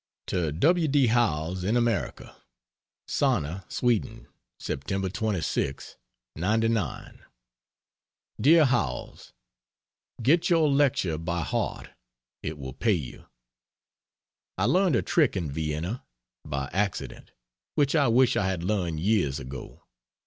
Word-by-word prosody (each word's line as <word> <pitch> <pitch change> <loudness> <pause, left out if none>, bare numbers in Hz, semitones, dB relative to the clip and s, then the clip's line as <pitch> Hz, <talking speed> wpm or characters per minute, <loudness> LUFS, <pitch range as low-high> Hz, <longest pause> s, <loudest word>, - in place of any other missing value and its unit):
To 85 -5 -1
W. 160 - +3
D. 140 -2 +3
Howells, 95 -7 +1
in 105 +6 +1
America: 120 -3 -1 0.7
SANNA, 85 +5 0
SWEDEN, 115 -2 -1 0.3
Sept. 95 -1 -3
26, 90 - -2 0.4
'99. 110 +1 -1 1.2
DEAR 160 +3 +6
HOWELLS, 125 -2 -2 0.9
Get 160 +8 +3
your 160 -4 +4
lecture 130 - +2
by 85 +1 -2
heart - - -3 0.5
it 75 0 -5
will 65 -2 -7
pay 105 - +1
you. 75 -9 -5 1.3
I - - +1
learned 185 -5 +3
a - - +1
trick 150 - +2
in 80 -6 -3
Vienna 80 - -3 0.4
by 70 -2 -3
accident 100 0 -2 0.5
which 140 -2 +2
I 145 -4 +4
wish 125 +2 +4
I 95 - +1
had 95 -3 -2
learned 90 -5 -1
years 90 -9 +1
ago. 65 0 -9
100 Hz, 110 wpm, -27 LUFS, 80-125 Hz, 1.3 s, DEAR